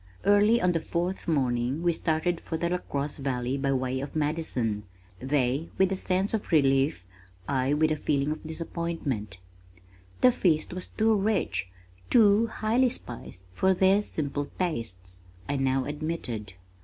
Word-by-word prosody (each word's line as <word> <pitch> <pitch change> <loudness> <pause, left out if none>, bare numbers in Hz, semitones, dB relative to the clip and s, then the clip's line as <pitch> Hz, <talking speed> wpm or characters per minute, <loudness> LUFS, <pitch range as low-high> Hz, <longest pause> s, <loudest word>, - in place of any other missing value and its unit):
Early 205 +3 +5
on 180 -3 +3
the 165 - 0
fourth 175 +4 -3
morning 130 -1 0
we 175 -1 +3
started 165 +2 0
for 160 - -4
the 170 +1 -1
LaCrosse 145 -5 -3
Valley 130 -2 -2
by 140 0 0
way 130 0 -1
of 140 +2 -6
Madison 145 -9 -1 0.4
they 135 +2 0
with 190 0 +3
a - - +1
sense 190 +2 -1
of 220 - -2
relief, 135 - +3 0.4
I 135 +3 +1
with 155 +1 +2
a - - +2
feeling 145 0 0
of 155 - -4
disappointment. 160 - -4 0.8
"The 255 - +7
feast 165 -8 +1
was 185 0 -4
too 220 0 +2
rich, 195 - 0 0.4
too 220 -1 +5
highly 230 +4 +1
spiced 115 - -6
for 190 - +2
their 190 +2 +4
simple 145 -6 -2
tastes," 95 - -3 0.3
I 140 - -1
now 135 0 +1
admitted. 145 - -4
155 Hz, 150 wpm, -27 LUFS, 130-180 Hz, 0.8 s, The